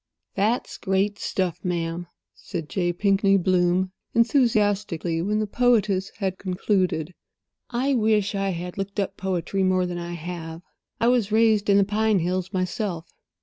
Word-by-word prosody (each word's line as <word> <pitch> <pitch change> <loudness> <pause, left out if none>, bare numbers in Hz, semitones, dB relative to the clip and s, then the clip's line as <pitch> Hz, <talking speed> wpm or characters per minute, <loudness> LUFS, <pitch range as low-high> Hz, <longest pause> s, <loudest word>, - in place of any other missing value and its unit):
"That's 215 +5 -1
great 195 +2 0
stuff, 180 -3 -2
ma'am," 170 -1 -2 0.3
said 165 -6 -6
J. 175 -3 0
Pinkney 195 +2 +3
Bloom, 180 0 +2 0.2
enthusiastically, 205 - +2
when 210 +4 0
the 215 - 0
poetess 210 -4 +2
had 190 -2 -2
concluded. 185 -3 0 0.6
"I 260 +3 0
wish 215 -4 +2
I 195 -1 -1
had 180 +1 -5
looked 200 +1 -3
up 195 0 -1
poetry 190 0 -2
more 185 -1 +2
than 175 -1 -4
I 170 0 -5
have. 170 0 -7 0.4
I 230 - +2
was 240 -4 +2
raised 220 -2 +3
in 200 - +6
the 200 - +5
pine 215 +1 +1
hills 180 +1 -1
myself." 185 -2 -3
190 Hz, 150 wpm, -24 LUFS, 180-210 Hz, 0.6 s, in